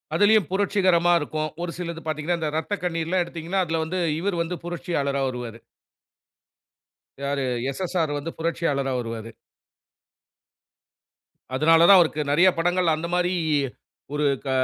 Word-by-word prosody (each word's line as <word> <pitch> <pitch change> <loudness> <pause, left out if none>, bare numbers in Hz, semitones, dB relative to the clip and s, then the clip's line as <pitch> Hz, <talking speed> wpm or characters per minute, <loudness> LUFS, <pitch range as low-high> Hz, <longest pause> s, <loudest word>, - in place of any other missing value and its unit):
அதிலயும் 205 -1 +4
புரட்சிகரமா 185 -3 +3
இருக்கும். 155 +1 -3
ஒரு 175 - -3
சிலது 170 -2 -5
பாத்தீங்கன்னா, 155 +3 -1
இந்த 155 -2 -2
"இரத்தக்கண்ணீர்"லாம் 175 0 -1
எடுத்தீங்கன்னா, 170 +3 -2
அதுல 160 0 -1
வந்து 185 +4 -3 0.2
இவுரு 185 -1 -1
வந்து 175 +1 -5
புரட்சியாளரா 145 -5 -2
வருவாரு. 120 -3 -6 1.6
யாரு 140 0 -1 0.3
"எஸ்.எஸ்.ஆர் 165 0 -1
வந்து 150 +3 -5
புரட்சியாளரா 160 -5 -1
வருவாரு." 115 -1 -6 2.2
அதனால 165 +4 +5
தான் 195 - +10
அவருக்கு 155 -3 +2
நெறையா 175 +6 +6
படங்கள் 175 0 +2
அந்த 160 +2 -4
மாரி, 180 +1 +1 0.8
ஒரு 150 0 0 0.2
க - - -3
165 Hz, 120 wpm, -24 LUFS, 150-180 Hz, 2.2 s, தான்